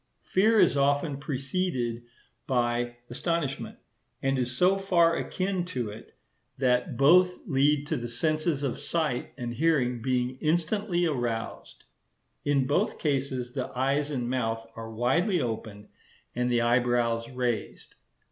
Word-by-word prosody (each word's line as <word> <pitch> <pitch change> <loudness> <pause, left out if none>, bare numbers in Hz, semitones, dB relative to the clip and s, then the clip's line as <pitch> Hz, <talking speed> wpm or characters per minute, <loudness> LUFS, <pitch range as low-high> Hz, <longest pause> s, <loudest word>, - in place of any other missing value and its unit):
Fear 215 +4 +3
is - - +5
often 140 +1 +1
preceded 135 -3 -2 0.5
by 120 -2 0 0.2
astonishment, 150 +1 -2 0.5
and 135 0 +1
is 125 0 -1
so 185 +2 +4
far 175 -4 +3
akin 185 0 -2
to 125 -11 -3
it, 105 - -12 0.4
that 125 -2 +1
both 180 +6 +4
lead 145 0 +2
to - - -1
the 120 - -4
senses 155 +4 0
of 135 -4 -2
sight 155 -7 -1
and 120 -2 -4
hearing 125 -4 +1
being 125 +1 -1
instantly 175 +3 +1
aroused. 120 -7 -3 0.6
In 140 -2 +2
both 145 - +1
cases 135 -4 -1
the - - -3
eyes 140 +3 +1
and 125 -5 -2
mouth 115 -3 -1
are 115 0 -7
widely 135 - +1
opened, 110 -4 -5 0.4
and 125 0 0
the 120 -1 +3
eyebrows 120 -1 +1
raised. 125 -3 -3
130 Hz, 130 wpm, -28 LUFS, 120-160 Hz, 0.6 s, is